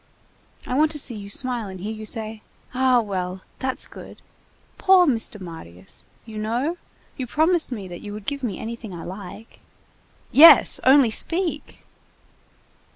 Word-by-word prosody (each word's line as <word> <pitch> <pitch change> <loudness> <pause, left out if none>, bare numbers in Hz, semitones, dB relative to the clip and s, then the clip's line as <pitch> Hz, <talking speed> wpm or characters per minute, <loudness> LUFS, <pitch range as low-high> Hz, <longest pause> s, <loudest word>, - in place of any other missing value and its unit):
I - - -4
want 305 +4 +3
to - - -5
see 270 -4 -2
you 200 -2 -8
smile 240 0 -1
and 190 -1 -9
hear 210 +4 -4
you 215 0 -7
say: 220 -1 -5 0.3
'Ah, 255 -1 +3
well, 185 -3 -4 0.2
that's 260 0 -2
good.' - - -12 0.6
Poor 375 -2 +6
Mr. 225 -6 -1
Marius! 95 - -10 0.2
you 220 -2 -8
know? 245 +10 -2 0.4
You 260 -3 -4
promised 315 +3 +1
me 205 -6 -5
that 175 -1 -9
you 205 - -8
would 210 -1 -8
give 280 0 -3
me 235 -7 -3
anything 225 -4 -7
I 165 - -8
like—" 195 +4 -10 0.7
"Yes! 325 +4 +8
Only 260 -3 +6
speak!" 340 - -2
225 Hz, 155 wpm, -23 LUFS, 200-265 Hz, 0.7 s, Yes